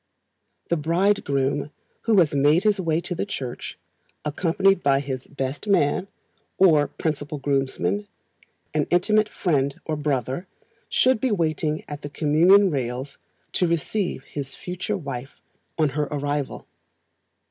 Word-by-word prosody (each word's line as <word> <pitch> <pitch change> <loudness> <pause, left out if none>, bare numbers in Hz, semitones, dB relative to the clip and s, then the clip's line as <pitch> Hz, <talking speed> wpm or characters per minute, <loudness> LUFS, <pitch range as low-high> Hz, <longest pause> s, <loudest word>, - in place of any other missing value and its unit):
The 170 - +3
Bridegroom, 150 -5 +1 0.4
who 225 -3 +4
has 165 -6 +4
made 145 +5 +4
his 210 -2 +2
way 165 -1 +1
to 175 - -4
the 170 - -2
church, 135 -11 -5 0.5
accompanied 180 +5 +2
by 135 -1 +3
his 135 -2 -5
"best 135 +6 -4
man," 185 -2 +2 0.5
or 155 -6 +5
principal 150 -1 -3
groomsman 130 -9 -1 0.7
an 150 -2 +1
intimate 210 +4 +3
friend 140 -6 0
or 155 - -1
brother 145 - -2 0.4
should 255 -3 +3
be 260 - +2
waiting 155 -5 0
at 145 0 -7
the 145 - -6
communion 170 +7 +5
rails 130 0 -3 0.3
to 180 - +2
receive 170 -1 -1
his 140 -2 -6
future 185 +3 -3
wife 135 -5 -7 0.4
on 155 -2 +3
her 150 +2 -1
arrival. 145 -1 -3
150 Hz, 130 wpm, -24 LUFS, 140-180 Hz, 0.7 s, or